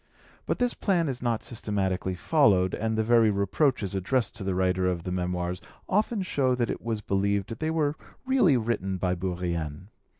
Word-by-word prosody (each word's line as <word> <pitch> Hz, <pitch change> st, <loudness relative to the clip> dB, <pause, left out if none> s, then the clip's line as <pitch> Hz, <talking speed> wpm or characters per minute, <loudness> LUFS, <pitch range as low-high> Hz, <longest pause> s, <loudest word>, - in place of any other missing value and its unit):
But -, -, 0 dB
this 245 Hz, -1 st, +1 dB
plan 175 Hz, -5 st, +1 dB
is 130 Hz, -3 st, -3 dB
not 120 Hz, -2 st, -1 dB
systematically 95 Hz, -5 st, -2 dB
followed, 95 Hz, -, +3 dB
and 110 Hz, 0 st, -1 dB
the 110 Hz, -, +2 dB
very 115 Hz, -1 st, +4 dB
reproaches 100 Hz, -, +1 dB
addressed 105 Hz, +5 st, 0 dB
to 100 Hz, -, -5 dB
the 95 Hz, -1 st, -1 dB
writer 95 Hz, 0 st, +1 dB
of 90 Hz, -2 st, -1 dB
the 90 Hz, -, -4 dB
Memoirs 90 Hz, 0 st, -2 dB, 0.3 s
often 210 Hz, +1 st, +1 dB
show 135 Hz, -8 st, +1 dB
that 120 Hz, -2 st, 0 dB
it -, -, -5 dB
was 110 Hz, -2 st, -3 dB
believed 100 Hz, +2 st, -1 dB
they 155 Hz, -, -1 dB
were 155 Hz, -2 st, +1 dB, 0.3 s
really 255 Hz, -, +4 dB
written 105 Hz, -5 st, -1 dB
by 90 Hz, 0 st, 0 dB
Bourrienne. 85 Hz, -2 st, -3 dB
105 Hz, 175 wpm, -27 LUFS, 90-130 Hz, 0.3 s, very